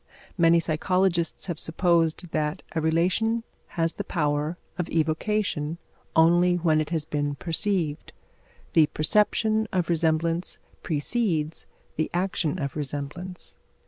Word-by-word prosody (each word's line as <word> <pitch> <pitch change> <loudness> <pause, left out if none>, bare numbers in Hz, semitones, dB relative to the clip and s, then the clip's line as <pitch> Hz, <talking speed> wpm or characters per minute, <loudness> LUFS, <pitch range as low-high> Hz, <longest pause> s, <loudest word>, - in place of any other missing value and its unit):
Many 170 -1 +5
psychologists 170 +1 +1
have 170 -4 -4
supposed 170 0 +1
that 150 -1 -1
a 160 - 0
relation 185 +9 +1 0.3
has 165 0 +1
the - - -4
power 150 0 -1 0.2
of 175 - -2
evocation 160 0 0 0.4
only 175 +2 +5
when 160 -3 +2
it 150 - -4
has 160 -3 -1
been 145 -1 -2
perceived. 160 - 0 0.6
The 155 -2 +6
perception 215 +7 +2
of 180 -3 0
resemblance 165 +1 0 0.2
precedes 160 -1 -1 0.3
the 155 - 0
action 180 -3 0
of 140 -5 -3
resemblance. 150 +5 -5
165 Hz, 115 wpm, -26 LUFS, 155-180 Hz, 0.6 s, The